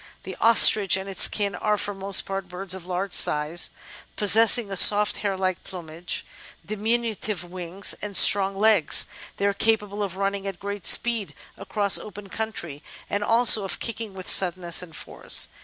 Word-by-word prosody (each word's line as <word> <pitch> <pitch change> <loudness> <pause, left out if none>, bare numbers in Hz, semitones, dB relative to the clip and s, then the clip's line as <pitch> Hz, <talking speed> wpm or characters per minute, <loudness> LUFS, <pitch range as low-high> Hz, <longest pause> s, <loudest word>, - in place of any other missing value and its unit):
The - - -9
Ostrich 215 -4 +6
and 190 +1 -8
its 195 -2 +2
kin 200 -2 -4
are 210 +3 -3
for 205 0 -5
the 195 - -16
most 195 0 +1
part 195 -2 -7
birds 180 +1 -4
of 185 -2 -7
large 185 +1 -5
size, 150 +3 +1 0.5
pos 205 -2 +3
sessing 225 +1 +4
a - - -5
soft, 210 +2 +4
hair 200 -2 -4
like 185 -1 -4
plumage, 170 -2 -7 0.4
diminutive 215 -2 -4
wings, 180 +2 -3
and 205 -2 -2
strong 195 -1 +5
legs; 210 -5 +3 0.3
they 200 - -3
are 200 - 0
capable 210 -1 -2
of 190 -2 -6
running 200 0 -4
at 195 -3 -8
great 200 0 -5
speed 230 -4 +2 0.2
across 200 0 0
open 205 -1 -12
country, 175 -10 -7 0.3
and 205 - -3
also 230 -1 +3
of 195 - -5
kicking 225 -3 -6
with 185 -1 -11
suddenness 175 -2 +2
and 165 -4 -13
force. - - -1
195 Hz, 175 wpm, -22 LUFS, 185-210 Hz, 0.5 s, Ostrich